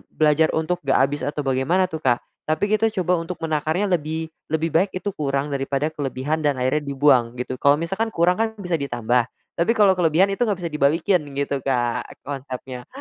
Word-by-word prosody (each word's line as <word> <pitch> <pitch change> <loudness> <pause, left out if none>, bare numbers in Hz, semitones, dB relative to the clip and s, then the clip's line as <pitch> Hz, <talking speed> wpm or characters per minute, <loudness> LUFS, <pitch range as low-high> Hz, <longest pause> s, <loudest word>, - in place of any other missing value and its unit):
belajar 155 +1 +2
untuk 160 +3 0
nggak 135 - +3
habis 145 +2 0
atau 150 0 -2
bagaimana 140 +8 +1
tuh, 160 - -4
Kak, 120 -5 +1 0.3
tapi 155 +6 +1
kita 220 +1 +3
coba 180 +1 +2
untuk 170 +1 -5
menakarnya 160 +5 0
lebih 160 -1 -1 0.2
lebih 160 +1 0
baik 185 +4 +3
itu 200 +2 -3
kurang 140 0 -1
daripada 140 +1 -1
kelebihan 145 +1 -2
dan 145 -2 +1
akhirnya 130 +4 +1
dibuang 135 -4 +3
gitu. 125 +1 -4
Kalau 140 +1 +5
misalkan 195 +8 -2
kurang 180 +5 +2
kan 220 0 0
bisa 180 -5 -2
ditambah 120 -2 0 0.3
tapi 175 +8 +1
kalau 205 -3 +6
kelebihan 180 +2 +3
itu 220 - -2
enggak 200 - 0
bisa 165 - -3
dibalikin 155 +5 +2 0.2
gitu, 140 0 -1
Kak, 120 -2 -2
konsepnya. 130 -2 -6
150 Hz, 185 wpm, -22 LUFS, 135-175 Hz, 0.3 s, kalau